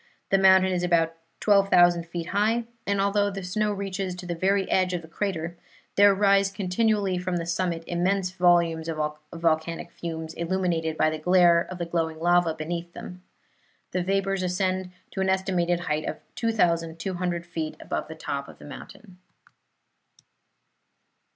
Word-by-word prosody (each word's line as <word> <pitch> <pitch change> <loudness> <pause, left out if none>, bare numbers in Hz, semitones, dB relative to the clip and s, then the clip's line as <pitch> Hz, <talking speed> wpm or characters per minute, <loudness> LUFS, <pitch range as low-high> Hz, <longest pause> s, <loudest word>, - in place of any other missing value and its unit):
The 195 - +4
mountain 190 -1 +6
is 180 -1 0
about 170 -2 +2 0.3
12,000 175 -4 +4
feet 170 0 -5
high, 220 +4 +1 0.2
and 200 0 +1
although 200 +1 +2
the 195 -1 -6
snow 210 +4 0
reaches 195 -2 -3
to 180 0 -9
the 175 - -3
very 190 +3 +1
edge 185 -1 +1
of 170 - -4
the - - -11
crater, 170 -2 -3 0.4
there 200 0 +6
rise 200 0 +4
continually 195 0 0
from 180 0 -2
the 170 - -3
summit 170 -1 -1
immense 180 +2 0
volumes 170 -3 +2
of 160 -1 -3 0.3
volcanic 165 0 -1
fumes, 160 -1 -6
illuminated 170 -2 -1
by 155 - +3
the 155 - -4
glare 175 0 +4
of 185 - -6
glowing 160 -2 -1
lava 175 -1 +3
beneath 170 +2 -5
them. 180 0 -9 0.7
The 185 - 0
vapors 195 +1 0
ascend 185 0 -1 0.2
to 190 - -3
an 190 - +1
estimated 180 -2 +1
height 155 -2 -2
of - - -3 0.2
2,200 175 -4 -1
feet 160 -2 -4
above - - -4
the 160 - -8
top 140 -3 -4
of - - -13
the - - -13
mountain. 180 +6 -12
180 Hz, 155 wpm, -26 LUFS, 170-195 Hz, 0.7 s, mountain